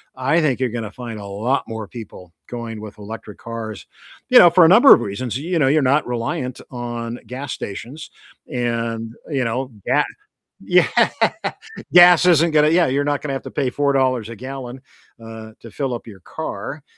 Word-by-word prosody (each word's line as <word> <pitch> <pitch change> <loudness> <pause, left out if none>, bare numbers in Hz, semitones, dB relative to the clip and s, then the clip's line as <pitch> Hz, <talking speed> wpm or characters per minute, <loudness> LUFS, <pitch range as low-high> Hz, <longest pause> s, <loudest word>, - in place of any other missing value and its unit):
I 135 +6 +1
think 140 -6 0
you're 130 - +1
gonna 115 -2 -5
find 115 -3 -8
a 100 - -8
lot 110 +7 -1
more 110 -2 -6
people 95 -6 -11 0.2
going 115 -3 -6
with 105 -1 -10
electric 105 0 -9
cars. 115 -3 -7 0.4
You 250 - +8
know, 175 - +9
for 175 0 +6
a - - +7
number 230 - +8
of - - +4
reasons, 110 +3 -4
you 165 +5 -2
know, 135 - +3
you're 150 +2 +3
not 140 +3 +2
reliant 125 +1 -3
on 120 -1 -5
gas 130 +2 -6
stations 125 +10 -8 0.4
and, 115 -2 -3
you 135 -5 -1
know, 130 +3 -3
ga 145 +4 +3 0.6
Yeah, - - +3 1.1
gas 175 -1 +8
isn't 170 -2 +4
gonna 150 0 +4
yeah, 170 +1 +3
you're 140 +2 0
not 145 0 -1
gonna 145 -2 -4
have 135 - -3
to - - -9
pay 135 -3 -1
$4 130 -4 +1
a 115 - -7
gallon, 130 +1 -8 0.4
uh, 110 -1 -10
to 115 - -12
fill 135 0 -3
up 120 - -7
your 100 -4 -12
car, 150 - -6
125 Hz, 185 wpm, -20 LUFS, 115-145 Hz, 1.1 s, know